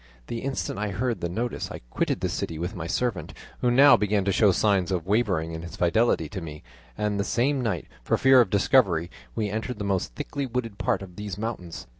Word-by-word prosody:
The 115 - -4
instant 135 -5 -3
I 105 0 -1
heard 115 +4 -2
the 85 - -1
notice 115 +7 -3
I - - -8
quitted - - -1
the - - +1
city 80 - -3
with 85 +3 -3
my 85 -2 -5
servant, 110 +1 -2 0.2
who 125 - +2
now 140 +4 +7
began 105 -1 +1
to 100 - +2
show 105 +1 +4
signs 95 -1 +2
of 90 -3 -1
wavering 95 -6 +1
in 80 0 -5
his 85 0 -8
fidelity 90 -1 +2
to 95 - -5
me, 75 -2 -8 0.3
and 105 -1 -1
the - - +2
same 130 +6 +1
night, 115 -4 -2 0.2
for - - +1
fear 135 -1 +6
of 115 - +1
discovery, 95 - +3 0.2
we 105 -3 -1
entered 110 +3 -3
the 105 - -4
most 95 -11 -1
thickly 140 -2 -4
wooded 115 -4 -4
part - - 0
of 90 -2 -12
these 105 -3 -5
mountains. 105 -6 -5
105 Hz, 220 wpm, -26 LUFS, 90-120 Hz, 0.3 s, now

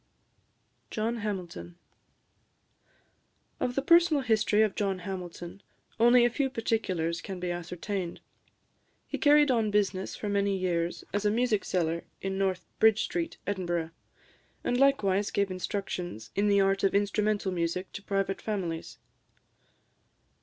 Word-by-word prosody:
JOHN 230 +2 -1
HAMILTON. 180 - -5 1.8
Of 245 - -1
the 275 - 0
personal 335 -2 +5
history 220 -2 +3
of 210 -3 +1
John 195 -2 -1
Hamilton 180 0 -7 0.4
only 240 +1 +6
a - - +4
few 270 +2 0
particulars 185 -9 -1
can 190 -2 -6
be 180 0 -2
ascertained. 175 +1 -4 0.9
He - - -5
carried 295 -1 +5
on 225 -3 +2
business 200 -2 0
for 210 - -5
many 200 -1 +1
years 175 -2 -1
as 205 0 0
a 210 - +3
music 220 -2 +1
seller 170 -2 -1 0.2
in 195 0 -3
North 190 -2 0
Bridge 220 -1 +5
Street, 335 -2 -3
Edinburgh, 175 -4 -2 0.7
and 245 - 0
likewise 205 -8 +3
gave 200 -1 0
instructions 180 - -4
in 205 +1 +2
the 200 -1 +4
art 195 0 +2
of 195 - +2
instrumental 205 0 +1
music 175 +1 -2
to 200 - -6
private 195 -1 -1
families. 180 -7 -4
200 Hz, 130 wpm, -29 LUFS, 180-220 Hz, 1.8 s, only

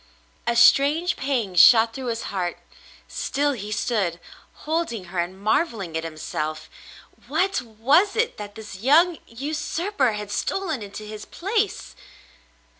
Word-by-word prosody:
A 235 - +2
strange 295 +8 +5
pang 255 -8 -1
shot 225 +5 +7
through 260 +1 -6
his 230 -1 -2
heart. 180 -3 -2 0.5
Still 290 +1 -1
he 210 -5 -6
stood, 205 -5 -1 0.5
holding 310 - -1
her 180 - -1
and 180 +2 -3
marvelling 210 - 0
at 160 - -1
himself. 155 -1 -5 0.6
What! 385 -5 +1
Was 260 - +2
it 455 +1 0
that 205 -1 -8
this 215 -3 -9
young 315 - +4
usurper 300 - -1
had 210 -1 -6
stolen 320 - -2
into 205 +1 -8
his 215 0 -8
place 415 +3 -2
235 Hz, 130 wpm, -24 LUFS, 205-310 Hz, 0.6 s, shot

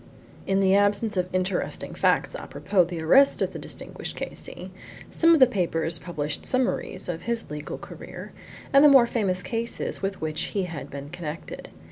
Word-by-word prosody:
In 195 0 +2
the 190 0 +4
absence 205 +2 +2
of 180 -1 0
interesting 185 0 -2
facts - - +2
apropos 195 -3 0
of 170 - +2
the 170 -2 -5
arrest 270 +12 +5
of - - -1
the - - -6
distinguished - - -6
K.C., - - -7 0.4
some 330 0 +5
of 325 - +6
the 260 - +9
papers 170 -7 -1
published 150 -4 -4
summaries 255 -6 0
of 170 -1 -4
his 235 -7 -3
legal 150 0 -5
career, - - -10 0.4
and 275 +1 +7
the 300 - +9
more 265 -4 +7
famous 195 -6 -1
cases 230 0 -3
with 195 0 -3
which 155 +5 -3
he 195 - +2
had 165 -5 -6
been 140 +1 -7
connected. 165 -2 -7
190 Hz, 175 wpm, -25 LUFS, 165-230 Hz, 0.4 s, the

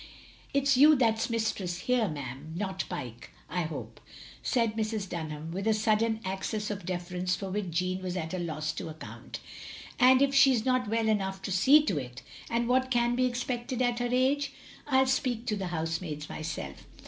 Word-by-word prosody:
" - - -25
It 280 0 +2
's 275 -2 +5
you 300 +3 +8
that 225 -4 +2
's - - -1
mistress 200 -6 -1
here, 250 -3 +2
ma'am, 145 0 -6
not 190 -1 -2
Pyke, 120 -4 -6 0.2
I 175 +1 -1
hope, 160 - -7 0.2
" - - -15
said 230 -4 +1
Mrs. 215 -2 -2
Dunham, 160 -2 -5
with 195 +5 -3
a 220 - +4
sudden 220 +1 +1
access 200 +3 -2
of 195 -3 -6
deference 180 0 -1
for 195 -1 -5
which 200 -2 -2
Jeanne 185 +2 -1
was 185 0 -3
at 160 0 -4
a 185 - -2
loss 155 -2 -2
to 160 - -6
account. 155 0 -9 0.3
" - - -13
And 255 +1 +7
if 275 0 +2
she 270 -1 +6
's 225 - -1
not 255 -2 +2
well 225 0 +1
enough 195 -3 0
to - - -3
see 270 +12 +6
to 170 - 0
it 125 -2 -8
— - - -15
^and 235 +1 +1
what 255 +2 +2
can 240 -1 +2
be 255 +1 +2
expected 245 0 -3
at 245 -1 +1
her 245 0 0
age? 270 +3 +2 0.2
— - - -20
I 285 - -6
'11 265 0 +5
speak 250 -3 0
to 220 -4 0
the 195 -2 -3
housemaids 160 -2 -3
myself. 150 - -6
210 Hz, 215 wpm, -29 LUFS, 175-245 Hz, 0.3 s, you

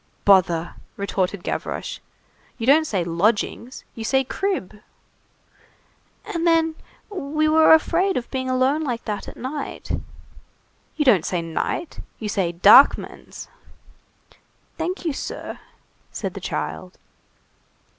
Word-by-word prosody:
"Bother!" 175 -4 +4 0.2
retorted 195 -1 -2
Gavroche, - - -4 0.6
"you 225 - -4
don't 310 +4 +5
say 190 -8 -1
'lodgings,' 210 +8 -1
you 225 - -7
say 265 +4 +2
'crib.'" 265 - -3 1.4
"And 345 -6 -2
then, 325 -1 +3 0.4
we 310 -4 -1
were 315 +1 +5
afraid 350 +4 +3
of 240 - -3
being 260 -1 -2
alone 260 +4 +2
like 245 -5 -3
that 210 -2 -4
at - - -10
night." 275 +3 -6 1.0
"You 300 - 0
don't 205 - +5
say 175 -1 -2
'night,' 165 - -3 0.2
you 215 - -5
say 190 -4 0
'darkmans.'" 200 +10 +4 1.3
"Thank 355 +3 -4
you, 320 - 0
sir," - - -6 0.5
said - - -4
the - - -8
child. - - -5
255 Hz, 115 wpm, -22 LUFS, 200-315 Hz, 1.4 s, don't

